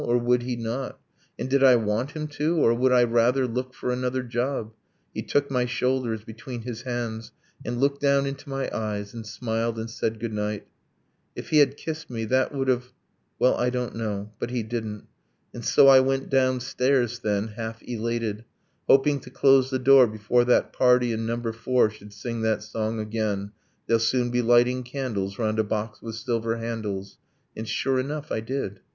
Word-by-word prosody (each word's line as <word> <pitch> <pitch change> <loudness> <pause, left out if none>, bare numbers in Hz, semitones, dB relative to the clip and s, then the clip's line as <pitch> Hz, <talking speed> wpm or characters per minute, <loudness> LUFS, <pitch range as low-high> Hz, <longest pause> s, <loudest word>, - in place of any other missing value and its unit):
Or 120 - +2
would 120 0 +2
he 125 0 -3
not? 120 +3 -4 0.4
And - - -3
did 135 +1 +2
I 130 -2 +8
want 115 +4 -1
him 155 -1 -4
to 150 +3 0
or 115 -7 +4
would 130 +2 +2
I 125 -1 +6
rather 120 +3 +3
Look 125 +1 -4
for 125 - -2
another 125 +1 -1
job? 120 -1 -2 0.4
He - - -3
took 140 -1 0
my 125 -2 +1
shoulders 125 -3 -1
Between 115 +2 -8
his 115 -2 -6
hands, 120 -3 -4 0.3
and 120 0 -3
looked 140 +1 +1
down 140 -1 +3
into 140 +1 -6
my 135 0 -2
eyes, 105 -2 -3
And 115 -2 -8
smiled, 115 +1 -2
and 110 0 -4
said 115 -1 -3
good 115 -1 -4
night. 105 0 -3 0.7
If - - -7
he 155 - +5
had 140 -1 +4
kissed 160 0 -6
me, 115 -2 -3
That 130 +4 +1
would 135 -2 -2
have 125 0 0 0.5
well, 125 - +4
I 125 - +1
don't 125 -2 -3
know; 105 -2 -4
but - - -3
he 120 -2 -2
didn't.. 110 -2 -5 0.5
And - - -7
so 135 - +5
I 135 -1 +9
went 135 +1 0
downstairs, 130 -1 +1
then, 105 -1 -1
half 115 +1 -6
elated, 115 -2 -3 0.4
Hoping 140 +1 +4
to - - -12
close 135 -1 +4
the 130 - 0
door 130 0 +7
before 110 +3 +1
that 125 - +2
party 125 -1 +4
In 110 0 -3
number 115 0 -2
four 115 0 +2
should 105 -1 -14
sing 115 +3 -5
that 110 -2 0
song 110 +1 -3
again 105 -2 -2 0.3
'They'll 115 - +3
soon 120 +2 +1
be 125 0 +2
lighting 120 +2 +4
candles 120 -7 -4
round 110 -1 0
a - - +4
box 105 0 -3
with 115 -1 -6
silver 115 -1 -1
handles' 110 -4 -5 0.4
And 110 +1 -6
sure 135 +2 0
enough, 145 +3 -4
I - - 0
did. 110 -4 -4
120 Hz, 190 wpm, -25 LUFS, 110-130 Hz, 0.7 s, I